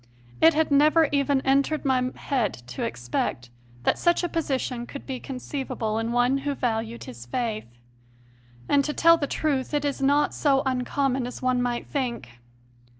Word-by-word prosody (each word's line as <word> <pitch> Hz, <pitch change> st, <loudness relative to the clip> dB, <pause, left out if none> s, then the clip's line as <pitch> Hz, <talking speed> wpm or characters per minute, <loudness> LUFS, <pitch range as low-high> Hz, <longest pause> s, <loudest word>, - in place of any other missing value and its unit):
It 325 Hz, -1 st, +6 dB
had 315 Hz, -1 st, +1 dB
never 305 Hz, +3 st, +5 dB
even 280 Hz, -1 st, +2 dB
entered 280 Hz, +3 st, +1 dB
my 255 Hz, -2 st, +2 dB
head 245 Hz, -8 st, -1 dB
to 120 Hz, 0 st, -9 dB
expect 120 Hz, 0 st, -3 dB, 0.3 s
that -, -, +1 dB
such 345 Hz, 0 st, +2 dB
a 350 Hz, -, 0 dB
position 260 Hz, -7 st, -2 dB
could 280 Hz, -, -9 dB
be 260 Hz, -2 st, -4 dB
conceivable 255 Hz, -4 st, -4 dB
in 225 Hz, +1 st, -2 dB
one 245 Hz, +3 st, +2 dB
who 285 Hz, 0 st, -2 dB
valued 230 Hz, -2 st, -2 dB
his 120 Hz, 0 st, -10 dB
faith. 215 Hz, -, -3 dB, 1.0 s
And, 280 Hz, -1 st, +3 dB
to 300 Hz, -, -2 dB
tell 335 Hz, +2 st, +6 dB
the 285 Hz, -, -2 dB
truth, 285 Hz, -2 st, -1 dB
it 290 Hz, 0 st, 0 dB
is 280 Hz, -1 st, -2 dB
not 285 Hz, +2 st, +3 dB
so 275 Hz, -2 st, +2 dB
un 255 Hz, -1 st, 0 dB
common 265 Hz, -2 st, 0 dB
as 250 Hz, -, -8 dB
one 255 Hz, -1 st, +2 dB
might 245 Hz, -1 st, -1 dB
think. 235 Hz, -, -4 dB
265 Hz, 170 wpm, -25 LUFS, 240-285 Hz, 1.0 s, It